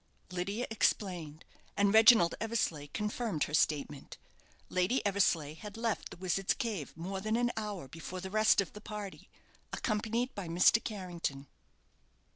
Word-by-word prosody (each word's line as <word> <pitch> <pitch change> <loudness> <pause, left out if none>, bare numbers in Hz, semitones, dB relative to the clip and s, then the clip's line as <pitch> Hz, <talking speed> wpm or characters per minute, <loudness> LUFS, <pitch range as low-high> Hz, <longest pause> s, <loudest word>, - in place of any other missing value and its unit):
Lydia 200 +7 -2
explained, 175 -8 -1 0.3
and 200 0 +3
Reginald 220 -6 +7
Eversleigh 210 -10 -1
confirmed 210 - -2
her 150 - -4
statement. 145 -2 0 0.5
Lady 185 +9 +1
Eversleigh 185 -7 +2
had 205 +6 -9
left 230 -2 -2
the - - -11
Wizard's 185 +1 0
Cave 215 - -3
more 190 +3 -4
than 215 +2 0
an 240 +1 +2
hour 210 -8 -4
before 165 +6 -7
the 190 +1 -6
rest 215 -1 +4
of 195 - -6
the 210 - -10
party, 210 -2 -7 0.4
accompanied 230 +3 -1
by 200 -4 -6
Mr. 180 +7 +4
Carrington. 175 -9 -4
195 Hz, 140 wpm, -32 LUFS, 170-215 Hz, 0.5 s, Reginald